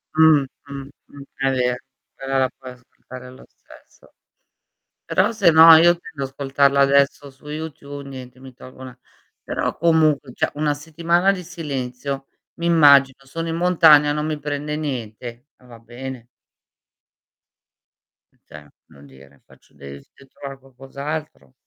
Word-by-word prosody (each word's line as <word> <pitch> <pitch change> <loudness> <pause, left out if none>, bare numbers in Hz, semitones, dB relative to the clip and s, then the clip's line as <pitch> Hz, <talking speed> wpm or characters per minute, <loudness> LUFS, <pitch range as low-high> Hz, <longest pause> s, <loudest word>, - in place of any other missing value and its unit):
Mh, 155 -3 +5 0.2
mh, 140 -1 -8 0.2
mh, 140 - -14
è 135 -1 0
vero, 125 -1 0 0.4
però 135 0 -3
la 130 - +1
puoi 130 -1 -10
ascoltare 125 0 -14
lo 130 +1 -15
stesso. - - -21 0.9
Però - - +1
se 195 -7 +4
no 160 +1 +9
io 170 +2 +5
tendo 145 -5 -8
ad 135 - -5
ascoltarlo 140 0 +1
adesso 140 +1 +2
su 135 +2 -19
YouTube 150 -2 -7
niente 130 -2 -11
mi 130 -1 -13
tolgo 130 +1 -14
'na 130 -1 -11 0.5
però - - -3
comunque 155 -5 +2
cioè, - - -1
1 150 0 0
settimana 170 +5 0
di 180 -2 -7
silenzio 135 -5 -6 0.3
mi 170 0 -3
immagino, 140 -5 +4
sono 165 +5 -5
in 165 - -3
montagna 160 -4 +5
non 150 0 -3
mi 155 -1 -3
prende 150 +1 -4
niente, 120 -3 -6
eh 125 - -24
va 120 -2 -14
bene. 120 +1 -9 2.1
E - - -36
ce 75 -1 -14 0.2
non 70 +1 -17
dire, 70 +1 -19
faccio - - -24
de 70 -1 -12
devi 70 - -17
trovare 135 -1 -10
qualcos'altro. 135 - -8
140 Hz, 145 wpm, -21 LUFS, 130-155 Hz, 2.1 s, no